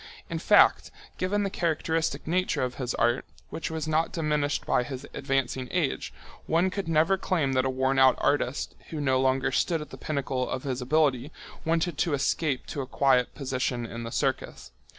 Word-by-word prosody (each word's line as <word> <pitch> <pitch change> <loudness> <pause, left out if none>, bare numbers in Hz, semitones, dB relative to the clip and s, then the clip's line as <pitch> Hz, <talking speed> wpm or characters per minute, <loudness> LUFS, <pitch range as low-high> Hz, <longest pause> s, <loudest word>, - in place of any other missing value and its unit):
In - - -2
fact, - - +5 0.3
given 205 +3 0
the 195 - -2
characteristic 160 -3 -1
nature 180 -3 0
of 125 -1 -2
his 125 -1 -2
art, 120 +2 +2 0.3
which 165 - -4
was 160 -1 -4
not 155 +1 +1
diminished 150 -3 -1
by - - +2
his 130 +2 -6
advancing 135 -2 -1
age, 170 -6 -1 0.4
one 175 +3 +2
could 195 -2 -4
never 165 +4 +3
claim 155 -9 0
that 130 0 +2
a - - +1
worn 130 +1 +1
out 130 -1 +6
artist, 140 -2 0 0.2
who 160 - -5
no 130 -2 +2
longer 130 0 +2
stood 165 -2 +1
at 150 -1 -8
the - - -8
pinnacle 135 -4 -2
of 130 - -3
his 130 -2 -3
ability, 140 0 +1 0.3
wanted 165 -1 0
to 160 -4 +2
escape 140 0 0
to 145 - -4
a 130 - -6
quiet 130 -2 +2
position 130 -3 -2
in 115 +1 -6
the 115 0 -6
circus. 65 - -2
140 Hz, 185 wpm, -27 LUFS, 130-160 Hz, 0.4 s, out